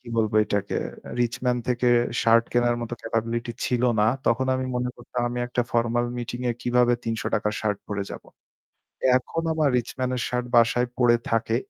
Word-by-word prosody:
কি 125 Hz, -, -14 dB
বলবো 110 Hz, -1 st, +1 dB
এটাকে 100 Hz, -1 st, -2 dB, 0.4 s
'RichMan' 125 Hz, +1 st, 0 dB
থেকে 125 Hz, 0 st, +2 dB, 0.3 s
শার্ট 115 Hz, 0 st, +5 dB
কেনার 120 Hz, 0 st, +2 dB
মত 120 Hz, -, -5 dB
ক্যাপাবিলিটি 115 Hz, +1 st, -2 dB
ছিল 125 Hz, -1 st, 0 dB, 0.2 s
না 105 Hz, -, +4 dB, 0.2 s
তখন 125 Hz, +3 st, +2 dB
আমি 130 Hz, 0 st, -1 dB
মনে 125 Hz, 0 st, -1 dB
করতাম 120 Hz, 0 st, -4 dB
আমি 125 Hz, -, -4 dB
একটা 120 Hz, 0 st, 0 dB
ফরমাল 120 Hz, +1 st, +1 dB
মিটিং 120 Hz, +1 st, -5 dB
এ -, -, +1 dB
কিভাবে 120 Hz, 0 st, +3 dB
৳৩০০ 110 Hz, -2 st, -1 dB
র -, -, -5 dB
শার্ট 105 Hz, -2 st, -1 dB
পরে 100 Hz, -1 st, -2 dB
যাব? -, -, -7 dB, 1.0 s
এখন 165 Hz, +6 st, -4 dB
আমার 155 Hz, -2 st, +2 dB
'RichMan' 125 Hz, +1 st, -1 dB
এর 125 Hz, -, -2 dB
শার্ট 125 Hz, 0 st, -1 dB
বাসায় 120 Hz, +1 st, +4 dB
পড়ে 120 Hz, -2 st, +5 dB
থাকে। 115 Hz, 0 st, +1 dB
120 Hz, 175 wpm, -25 LUFS, 115-125 Hz, 1.0 s, শার্ট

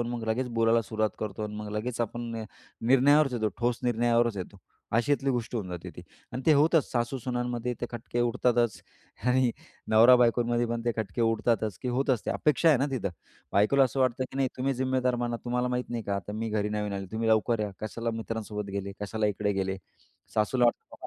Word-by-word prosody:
आणि 120 Hz, -, -1 dB
मग 120 Hz, -1 st, -4 dB
लगेच 125 Hz, +3 st, 0 dB
बोलायला 115 Hz, 0 st, +4 dB
सुरुवात 110 Hz, -1 st, -1 dB
करतो 105 Hz, 0 st, -4 dB
आणि 105 Hz, 0 st, -6 dB
मग 105 Hz, -1 st, -6 dB
लगेच 115 Hz, +3 st, -3 dB
आपण 120 Hz, +1 st, -2 dB
नि 115 Hz, -1 st, -4 dB, 0.4 s
निर्णयावरच 135 Hz, +2 st, +5 dB
येतो. 110 Hz, -3 st, 0 dB
ठोस 120 Hz, -1 st, 0 dB
निर्णयावरच 120 Hz, -2 st, +2 dB
येतो. 95 Hz, +1 st, -7 dB, 0.4 s
अशातली 135 Hz, +3 st, +2 dB
गोष्ट 120 Hz, -1 st, -2 dB
होऊन 105 Hz, -6 st, -2 dB
जाते 90 Hz, -1 st, -6 dB
ती -, -, -8 dB, 0.3 s
आणि 130 Hz, -, -4 dB
ते 155 Hz, -, +7 dB
होतच. 155 Hz, +1 st, +3 dB
सासू-सुनांमध्ये 125 Hz, -1 st, -2 dB
ते 120 Hz, -, -1 dB
खटके 120 Hz, 0 st, -4 dB
उडतातच 120 Hz, -2 st, +1 dB, 0.5 s
आणि 125 Hz, 0 st, +3 dB, 0.4 s
नवरा-बायकोंमध्ये 120 Hz, +1 st, +5 dB
पण 115 Hz, 0 st, -3 dB
ते 120 Hz, -, +1 dB
खटके 110 Hz, +1 st, -3 dB
उडतातच 115 Hz, -3 st, +1 dB
की 125 Hz, -, -2 dB
होतच 125 Hz, -2 st, 0 dB
ते. -, -, +1 dB
अपेक्षा 150 Hz, +2 st, +2 dB
आहे 150 Hz, -, +5 dB
ना 140 Hz, -, +1 dB
तिथं. 120 Hz, -7 st, -2 dB, 0.4 s
बायकोला 135 Hz, +7 st, +4 dB
असं 130 Hz, +2 st, -2 dB
वाटतं 130 Hz, 0 st, +1 dB
की 135 Hz, -, -8 dB
"नाही 135 Hz, -1 st, +2 dB
तुम्ही 135 Hz, +1 st, 0 dB
जिम्मेदार 130 Hz, -1 st, +1 dB
बना. 120 Hz, -1 st, -1 dB
तुम्हाला 125 Hz, +1 st, 0 dB
माहीत 125 Hz, 0 st, -2 dB
नाही 115 Hz, -2 st, -3 dB
का 100 Hz, 0 st, -2 dB
आता 100 Hz, +1 st, -6 dB
मी 110 Hz, +1 st, -3 dB
घरी 105 Hz, -1 st, 0 dB
नवीन 105 Hz, -1 st, -2 dB
आली. 95 Hz, -1 st, -4 dB
तुम्ही 115 Hz, +1 st, -1 dB
लवकर 110 Hz, +1 st, +2 dB
या. 105 Hz, -1 st, -1 dB
कशाला 115 Hz, +2 st, -3 dB
मित्रांसोबत 110 Hz, -2 st, -4 dB
गेले? 100 Hz, 0 st, -4 dB
कशाला 105 Hz, +1 st, -1 dB
इकडे 105 Hz, 0 st, 0 dB
गेले?" 95 Hz, 0 st, -1 dB, 0.6 s
सासूला 120 Hz, +4 st, +2 dB
वाटतं, 120 Hz, -, -1 dB
120 Hz, 195 wpm, -28 LUFS, 110-125 Hz, 0.6 s, ते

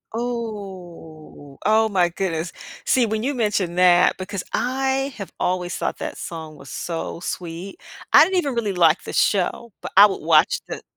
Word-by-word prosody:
Ooh, 190 Hz, -, -7 dB
oh 220 Hz, +1 st, +4 dB
my 180 Hz, -4 st, +2 dB
goodness. 170 Hz, -2 st, -3 dB, 0.3 s
See, 255 Hz, -2 st, +3 dB
when 220 Hz, 0 st, -2 dB
you 280 Hz, +3 st, 0 dB
mentioned 205 Hz, -7 st, -1 dB
that 180 Hz, -1 st, +5 dB
because 190 Hz, 0 st, -5 dB
I 265 Hz, +2 st, 0 dB
have 200 Hz, -3 st, -7 dB
always 180 Hz, -1 st, -1 dB
thought -, -, -3 dB
that -, -, -5 dB
song 160 Hz, -2 st, -7 dB
was 140 Hz, -2 st, -13 dB
so 165 Hz, -1 st, -5 dB
sweet. 175 Hz, +2 st, -6 dB, 0.3 s
I -, -, +9 dB
didn't 375 Hz, +3 st, 0 dB
even 285 Hz, -7 st, 0 dB
really 225 Hz, -4 st, -1 dB
like 170 Hz, -2 st, +3 dB
the -, -, -7 dB
show, 205 Hz, +4 st, +1 dB
but -, -, -7 dB
I 200 Hz, -, +11 dB
would 200 Hz, -, -1 dB
watch 155 Hz, -1 st, +3 dB
the -, -, -6 dB
190 Hz, 170 wpm, -22 LUFS, 170-225 Hz, 0.3 s, I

